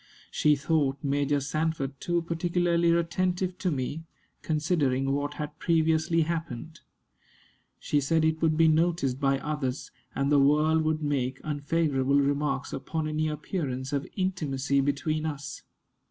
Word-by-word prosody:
She 150 -1 +3
thought 140 -2 +1
Major 145 0 +1
Sanford 145 -1 -2
too 175 -1 0
particularly 170 0 +1
attentive 180 +2 0
to 185 - 0
me, 145 +2 -3 0.4
considering 150 -4 0
what 145 +1 -2
had 150 0 -6
previously 165 0 +2
happened. 160 -2 -5 1.0
She 145 - 0
said 160 +3 +2
it 160 0 0
would 160 -1 +2
be 165 0 +5
noticed 155 -5 +2
by 135 -1 +2
others, 140 -2 -3 0.2
and 140 +1 0
the 145 - +5
world 150 +3 +4
would 155 0 0
make 130 -3 -1
unfavorable 145 -2 +1
remarks 140 -1 0
upon 160 -1 -3
any 155 0 0
appearance 145 -4 -3
of 140 -1 -1
intimacy 145 -8 0
between 150 +3 -1
us. 145 -2 -6
150 Hz, 135 wpm, -28 LUFS, 140-165 Hz, 1.0 s, be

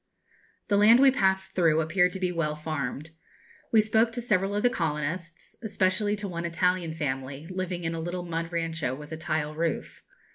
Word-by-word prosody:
The 200 - +2
land 220 +4 +7
we 270 0 +7
passed 190 -5 +1
through 165 -3 +3
appeared 180 +3 +2
to 190 - -5
be 180 -1 0
well 160 -3 -1
farmed. 150 -1 -4 0.6
We 220 - +6
spoke 220 +2 +2
to 240 - -3
several 200 -3 +1
of 205 - -1
the 245 - +5
colonists, 165 - -3
especially 205 -1 +1
to 205 -1 -5
one 170 -2 -4
Italian 170 -1 0
family, 135 -1 -4
living 185 -1 -3
in 165 0 -2
a 165 - -4
little 175 +2 -4
mud 165 0 -4
rancho 165 -6 -2
with 150 +2 -11
a 160 - -4
tile 155 -1 -2
roof. 165 0 -3
170 Hz, 185 wpm, -27 LUFS, 160-190 Hz, 0.6 s, land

